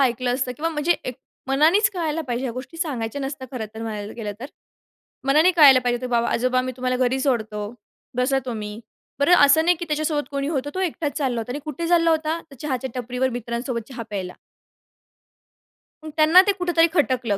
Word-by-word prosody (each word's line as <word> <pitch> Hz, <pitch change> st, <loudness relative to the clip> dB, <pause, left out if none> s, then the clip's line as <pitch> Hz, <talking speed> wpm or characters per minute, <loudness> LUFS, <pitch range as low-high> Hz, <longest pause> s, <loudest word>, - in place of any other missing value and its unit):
ऐकलं 245 Hz, -1 st, +1 dB
असतं 255 Hz, -1 st, -2 dB
किंवा 325 Hz, +2 st, -1 dB
म्हणजे 315 Hz, +2 st, +1 dB
एक 255 Hz, -, -4 dB, 0.3 s
मनानेच 315 Hz, +10 st, +4 dB
कळायला 325 Hz, -4 st, -2 dB
पाहिजे, 250 Hz, -2 st, -3 dB
ह्या 250 Hz, -, -2 dB
गोष्टी 255 Hz, +7 st, -8 dB
सांगायच्या 285 Hz, -6 st, -3 dB
नसत्या, 270 Hz, -1 st, -5 dB
खरं 235 Hz, -4 st, -4 dB
तर, 225 Hz, -, -6 dB
म्हणायला 210 Hz, -2 st, -5 dB
गेलं 215 Hz, -3 st, -4 dB
तर. 260 Hz, -, -5 dB, 0.8 s
मनाने 305 Hz, +6 st, +5 dB
कळायला 280 Hz, -5 st, +8 dB
पाहिजे, 245 Hz, 0 st, -1 dB
"बाबा 235 Hz, -1 st, +1 dB
आजोबा, 255 Hz, +1 st, +1 dB
मी 255 Hz, -, -3 dB
तुम्हाला 255 Hz, 0 st, -1 dB
घरी 260 Hz, +2 st, 0 dB
सोडतो, 225 Hz, -6 st, -1 dB, 0.6 s
बसा 270 Hz, +2 st, +2 dB
तुम्ही." 215 Hz, -3 st, -5 dB, 0.4 s
बरं 285 Hz, +5 st, +4 dB
असं 315 Hz, +3 st, +4 dB
नाही 355 Hz, 0 st, +4 dB
की 345 Hz, -, -4 dB
त्याच्यासोबत 300 Hz, -1 st, 0 dB
कोणी 280 Hz, 0 st, -2 dB
होतं, 290 Hz, -2 st, -2 dB
तो -, -, -2 dB
एकटाच 325 Hz, -4 st, -2 dB
चालला 260 Hz, -5 st, -1 dB
होता 225 Hz, -, -6 dB
आणि 285 Hz, -, -4 dB
कुठे 310 Hz, +3 st, -4 dB
चालला 335 Hz, -1 st, +4 dB
होता, 315 Hz, +1 st, 0 dB
तर 275 Hz, -, -12 dB
चहाच्या 265 Hz, -3 st, -3 dB
टपरीवर 250 Hz, +1 st, -1 dB
मित्रांसोबत 235 Hz, -1 st, -4 dB
चहा 245 Hz, -3 st, -6 dB
प्यायला. 190 Hz, -3 st, -4 dB, 1.7 s
अ, -, -, -8 dB
त्यांना 315 Hz, +4 st, +7 dB
ते -, -, +5 dB
कुठेतरी 345 Hz, -2 st, +3 dB
खटकलं, 250 Hz, -, +1 dB
265 Hz, 185 wpm, -23 LUFS, 245-310 Hz, 1.7 s, कळायला